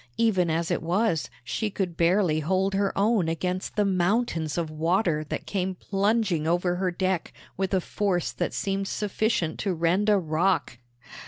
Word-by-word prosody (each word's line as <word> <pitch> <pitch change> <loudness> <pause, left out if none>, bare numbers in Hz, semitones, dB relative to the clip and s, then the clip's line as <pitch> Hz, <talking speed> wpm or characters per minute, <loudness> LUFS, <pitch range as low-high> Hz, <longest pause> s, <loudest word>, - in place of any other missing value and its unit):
Even 195 -7 +2
as 165 +1 0
it - - 0
was, 175 0 0
she 210 - -2
could 190 -4 -3
barely 170 -2 +2
hold 190 +5 0
her 195 0 +1
own 200 -4 +2
against 180 +3 -3
the 210 - +2
mountains 185 -4 0
of 165 -2 -2
water 165 0 +1
that - - -5
came 190 -1 -2
plunging 195 -4 0
over 175 +1 +1
her 185 0 0
deck 185 0 -1 0.2
with 190 0 -2
a 190 -2 +2
force 185 -2 -1
that - - -2
seemed 195 0 -2
sufficient 210 -5 -1
to 195 -4 -1
rend 175 +6 +2
a 210 - +5
rock. 165 -5 0
185 Hz, 165 wpm, -26 LUFS, 165-200 Hz, 0.2 s, a